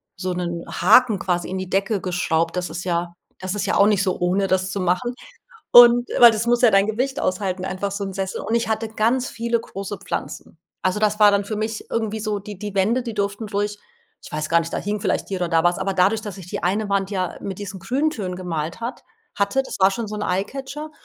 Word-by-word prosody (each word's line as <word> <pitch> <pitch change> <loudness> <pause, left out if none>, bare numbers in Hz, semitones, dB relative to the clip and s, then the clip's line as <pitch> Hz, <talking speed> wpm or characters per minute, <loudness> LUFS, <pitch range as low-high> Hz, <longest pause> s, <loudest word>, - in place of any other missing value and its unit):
so 185 0 -3
'nen 175 -1 -3
Haken 240 -6 +4
quasi 175 -2 -1
in 190 - -3
die 185 -1 -5
Decke 195 +2 0
geschraubt. 170 -2 0
Das 180 -2 -2
ist 170 +2 -5
ja 170 -1 -1 0.3
das 185 +1 -4
ist 205 - -2
ja - - 0
auch 200 - +6
nicht 205 -3 +2
so 185 -2 -1
ohne, 185 +2 +1
das 185 0 0
zu 200 - -3
machen. 185 +8 0 0.6
Und 240 0 +8
weil 240 -1 +11
das 220 +1 -2
muss 240 +1 +2
ja 240 - +7
dein 195 0 +5
Gewicht 260 +6 -1
aushalten, 185 0 -1
einfach 190 +2 -3
so 200 +1 -4
'n 195 - -5
Sessel. 195 -1 -3
Und 220 - -2
ich 235 - 0
hatte 220 0 -1
ganz 230 +4 0
viele 235 0 -1
große 200 -2 -7
Pflanzen. - - -6 0.2
Also, 185 +2 +1
das 210 0 +1
war 210 -1 +8
dann 200 0 +1
für 215 +1 -4
mich 215 +1 -3
irgendwie 220 -1 -2
so 210 -1 -2
die 205 -1 -9
die 205 0 -6
Wände, 215 +6 +2
die 230 -2 -5
durften 205 +2 -2
ruhig 205 0 -2 0.5
ich - - -12
weiß 155 0 -2
gar 170 - +4
nicht, 165 0 -6
da - - -1
hing 205 +1 -3
vielleicht - - -1
hier 195 - -2
oder 175 -2 -2
da 165 -1 +3
was, 175 0 +3
aber 195 0 -1
dadurch, 195 +4 +2
dass 205 -2 -7
ich 185 - -10
die - - -5
eine 200 +4 0
Wand 200 -1 0
ja 185 -3 -2
mit 195 -2 -5
diesen 200 -2 -6
Grüntönen 220 - -2
gemalt 170 -1 -4
hat 235 +3 -5 0.3
hatte, 200 +7 +1
das - - -7
war 190 +1 +6
schon 220 +2 -4
so 210 - -5
'n 210 - -4
Eyecatcher 270 +11 -3
200 Hz, 240 wpm, -22 LUFS, 185-220 Hz, 0.6 s, weil